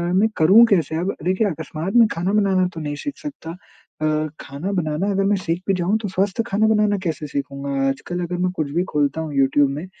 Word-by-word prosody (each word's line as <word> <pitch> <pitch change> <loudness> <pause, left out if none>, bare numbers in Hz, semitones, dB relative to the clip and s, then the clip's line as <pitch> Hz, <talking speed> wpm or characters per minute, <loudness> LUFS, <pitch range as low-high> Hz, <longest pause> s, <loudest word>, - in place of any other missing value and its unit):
मैं 210 +4 +4
करूँ 195 +9 +7
कैसे? 165 -5 +1
अब 180 +4 -1
देखिए 185 +4 +2
अकस्मात 160 +2 -5
में 230 -2 +7
खाना 180 +4 -1
बनाना 190 -3 +3
तो 165 - -6
नहीं 145 -1 -3
सीख 285 - -6
सकता। 280 - -7
अ, 155 -3 -4
खाना 145 +8 -5
बनाना 170 +1 -1
अगर 195 0 +1
मैं 205 +1 +3
सीख 175 -1 -2
भी 195 - +3
जाऊँ 185 +4 +1
तो 210 - -3
स्वस्थ 190 +3 0
खाना 215 +2 +2
बनाना 210 -2 +2
कैसे 155 -3 -3
सीखूँगा? 140 0 -4 0.2
आजकल 175 +6 -4
अगर 175 +1 -3
मैं 180 0 0
कुछ 150 -3 -2
भी 175 +4 +1
खोलता 145 +1 0
हूँ 155 -2 -5
यूट्यूब 135 +1 +3
में 150 +6 -5
175 Hz, 215 wpm, -21 LUFS, 155-195 Hz, 0.2 s, करूँ